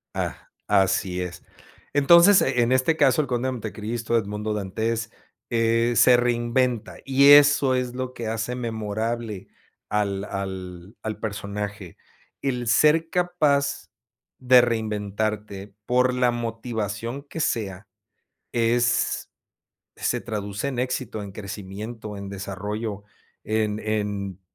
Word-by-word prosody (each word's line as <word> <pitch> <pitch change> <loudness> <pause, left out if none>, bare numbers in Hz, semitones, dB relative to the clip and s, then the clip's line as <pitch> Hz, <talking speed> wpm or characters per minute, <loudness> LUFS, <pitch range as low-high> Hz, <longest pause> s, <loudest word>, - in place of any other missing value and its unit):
Ah, - - -4 0.2
así 95 -1 +2
es. 90 -1 -6 0.5
Entonces, 170 +7 +7
en 120 0 +2
este 130 +5 +2
caso, 145 0 +4
el 145 - -4
conde 125 0 -1
de - - 0
Monte 110 -3 -5
Cristo, 115 +2 -2
Edmundo 105 0 -2
Dantés, 110 +3 -2 0.4
eh, 115 0 +2
se 125 +2 +7
reinventa 120 0 0
y 140 +1 +5
eso 145 -2 +6
es 125 -1 -2
lo 130 0 -4
que 115 -2 -5
hace 115 +2 -2
memorable 110 -2 -3 0.4
al 100 -2 -1
al 95 0 -6
al 110 -1 -5
personaje. 100 -3 -5 0.4
El 125 -3 -2
ser 155 +6 +4
capaz 150 -6 +1 0.5
de 125 -1 +6
reinventarte 105 -3 -2
por 125 +2 +2
la 125 -1 +2
motivación 115 +1 -4
que 150 +3 -8
sea 105 - -2 0.6
es 120 +1 +1 0.7
se - - -1
traduce 105 +1 -4
en 130 -3 -4
éxito, 125 -3 -2
en 100 -1 -8
crecimiento, 105 +2 -7
en 100 0 -7
desarrollo, 100 +2 -5 0.4
en 110 -1 0
en 105 -3 -3
115 Hz, 120 wpm, -24 LUFS, 105-125 Hz, 0.7 s, Entonces